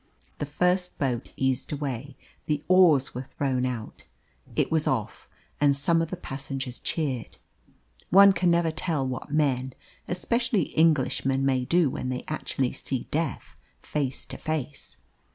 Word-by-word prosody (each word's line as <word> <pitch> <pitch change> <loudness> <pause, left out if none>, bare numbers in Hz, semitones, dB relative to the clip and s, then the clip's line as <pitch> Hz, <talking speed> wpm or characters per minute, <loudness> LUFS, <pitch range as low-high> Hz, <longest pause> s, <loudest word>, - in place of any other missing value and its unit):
The 145 - -2
first 180 +4 +1
boat 125 -4 -1
eased 130 -1 0
away. 140 -2 -4 0.3
The 150 -1 0
oars 170 -7 +5
were 125 +1 -6
thrown 130 -3 +1
out. 120 -4 -6 0.5
It - - +1
was 160 -1 +2
off, 115 -6 -2 0.3
and 140 -1 +4
some 165 +4 +2
of 165 - -2
the 185 - -4
passengers 135 -4 -5
cheered. 135 -8 -2 0.7
One 195 +1 +8
can 175 0 +2
never 170 -1 +3
tell 155 -3 -1
what 125 -2 -5
men, 130 -4 +1 0.3
especially 230 - 0
Englishmen, 135 -4 +2
may 130 -2 +1
do 170 -2 +3
when 130 - -4
they 125 -1 -3
actually 135 -4 -2
see 130 -1 -3
death 160 +2 -2 0.3
face 140 -3 -2
to - - -7
face. 150 -3 -4
145 Hz, 145 wpm, -27 LUFS, 130-165 Hz, 0.7 s, One